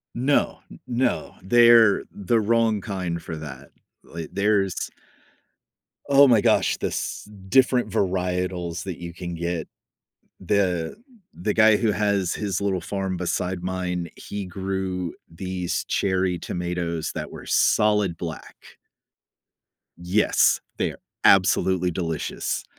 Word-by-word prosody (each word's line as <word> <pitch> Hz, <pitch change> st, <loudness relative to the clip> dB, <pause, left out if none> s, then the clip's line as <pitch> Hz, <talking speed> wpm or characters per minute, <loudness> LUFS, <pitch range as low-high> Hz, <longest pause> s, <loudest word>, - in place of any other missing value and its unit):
No. 135 Hz, +4 st, +1 dB
N -, -, -13 dB
no. 125 Hz, 0 st, -1 dB
They're 115 Hz, 0 st, +6 dB
the 105 Hz, +3 st, 0 dB
wrong 110 Hz, -1 st, +2 dB
kind 90 Hz, -4 st, -4 dB
for 80 Hz, -, -6 dB
that. 80 Hz, -1 st, -9 dB, 0.3 s
Li 80 Hz, -2 st, -8 dB
there's 100 Hz, -2 st, 0 dB, 1.2 s
oh 140 Hz, 0 st, +7 dB
my 120 Hz, -5 st, +5 dB
gosh, -, -, +3 dB
this -, -, -4 dB, 0.2 s
different 125 Hz, +1 st, +3 dB
varietals 90 Hz, -3 st, -1 dB
that 95 Hz, -3 st, -5 dB
you 85 Hz, -1 st, -7 dB
can 85 Hz, 0 st, -6 dB
get. 85 Hz, -1 st, -3 dB, 0.7 s
The 90 Hz, -, 0 dB, 0.4 s
the 175 Hz, -, -2 dB
guy 110 Hz, -1 st, +6 dB
who 110 Hz, -1 st, +1 dB
has 100 Hz, -4 st, 0 dB
his 100 Hz, -3 st, -2 dB
little 100 Hz, -2 st, 0 dB
farm 95 Hz, -1 st, -3 dB
beside 90 Hz, 0 st, -2 dB
mine, 90 Hz, -2 st, -3 dB
he 100 Hz, -1 st, -6 dB
grew 95 Hz, -1 st, -3 dB, 0.2 s
these 90 Hz, +1 st, -3 dB
cherry 95 Hz, -2 st, 0 dB
tomatoes 85 Hz, -2 st, -3 dB
that -, -, -5 dB
were -, -, -10 dB
solid 105 Hz, -5 st, +2 dB
black. 85 Hz, -2 st, -7 dB, 1.4 s
Yes. 90 Hz, +5 st, +2 dB, 0.2 s
They're -, -, -2 dB, 0.3 s
absolutely 95 Hz, -1 st, +4 dB
delicious. 80 Hz, -2 st, -3 dB
95 Hz, 115 wpm, -24 LUFS, 90-105 Hz, 1.4 s, oh